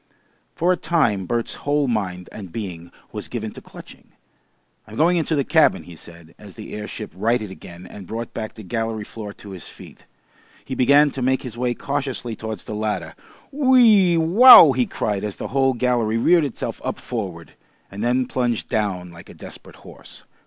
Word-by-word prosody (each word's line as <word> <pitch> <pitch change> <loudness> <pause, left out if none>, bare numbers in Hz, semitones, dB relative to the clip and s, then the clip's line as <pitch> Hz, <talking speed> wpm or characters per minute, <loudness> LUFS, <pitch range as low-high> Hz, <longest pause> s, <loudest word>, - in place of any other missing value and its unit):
For 175 +2 +1
a - - -3
time 115 - 0
Bert's 120 -1 -2
whole 145 0 0
mind 95 -6 -3
and 95 -5 -9
being 90 -6 -7 0.2
was - - -6
given - - -5
to - - -11
clutching. - - -15 0.7
"I'm 110 - -11
going 170 +7 +3
into 160 -1 0
the 140 - +1
cabin," - - +3
he 90 - -12
said, 85 0 -15
as 100 -3 -13
the - - -10
airship 105 +1 -7
righted 110 +1 -1
again 90 -1 -12
and 95 0 -11
brought 115 +1 -6
back 110 -1 -6
the 110 - -10
gallery 115 +1 -3
floor 105 0 -8
to 100 - -13
his 95 -4 -9
feet. - - -14 0.6
He 130 - -6
began 140 +3 +4
to 130 - -6
make 130 +1 +1
his 125 -4 -7
way 120 0 -1
cautiously 135 -4 -4
towards 110 -3 -6
the - - -7
ladder. 105 0 -3 0.4
"Whee 240 - +5
wow!" 170 - +9
he 125 -1 0
cried 105 -2 -3
as 105 -2 -5
the - - -6
whole 135 -1 +2
gallery 120 -2 0
reared 165 +6 +3
itself 135 - -5
up - - -3
forward, 95 -8 -6 0.4
and 100 +2 -6
then 125 +2 +1
plunged 120 -2 -2
down 95 -6 -2
like 85 +1 -14
a - - -13
desperate - - -12
horse. - - -14
115 Hz, 185 wpm, -21 LUFS, 100-135 Hz, 0.7 s, wow